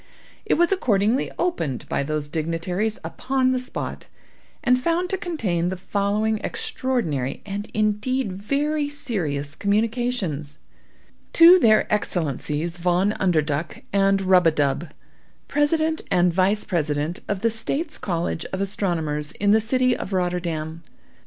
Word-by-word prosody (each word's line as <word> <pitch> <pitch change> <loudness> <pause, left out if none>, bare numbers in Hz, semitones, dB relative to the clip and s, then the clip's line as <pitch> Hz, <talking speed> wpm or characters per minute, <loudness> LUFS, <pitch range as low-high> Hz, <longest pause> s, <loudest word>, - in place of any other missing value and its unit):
It - - +3
was 345 +2 +3
accordingly 225 - +2
opened 165 - -2
by - - -1
those 150 +1 -2
dignitaries 170 +7 -2
upon 260 0 0
the 255 - +1
spot, 255 +1 -6 0.6
and 250 -2 +3
found 345 +5 0
to - - +1
contain 200 - -1
the 185 - -4
following 205 +3 0
extraordinary, 245 - -2
and 205 +1 -5
indeed 215 +2 0
very 285 +9 -1
serious, 170 - -3
communication: 215 - 0 0.9
"To 345 +2 +9
their 215 -7 +5
Excellencies 165 -3 -2
Von 180 +3 +2
Underduk 155 -3 0
and 195 0 +3
Rub 185 -2 +5
a - - +5
dub, 145 +2 0 0.6
President 315 +2 +2
and 175 -1 +3
Vice 195 +4 +2
President 155 -3 -1
of 200 -2 -2
the 230 +1 +2
States' 275 +8 -2
College 170 -2 -2
of 190 - -5
Astronomers, 165 -7 -2
in 205 0 +1
the 220 +1 +5
city 255 +2 +2
of 195 - -6
Rotterdam. 170 -3 -2
200 Hz, 130 wpm, -23 LUFS, 170-250 Hz, 0.9 s, To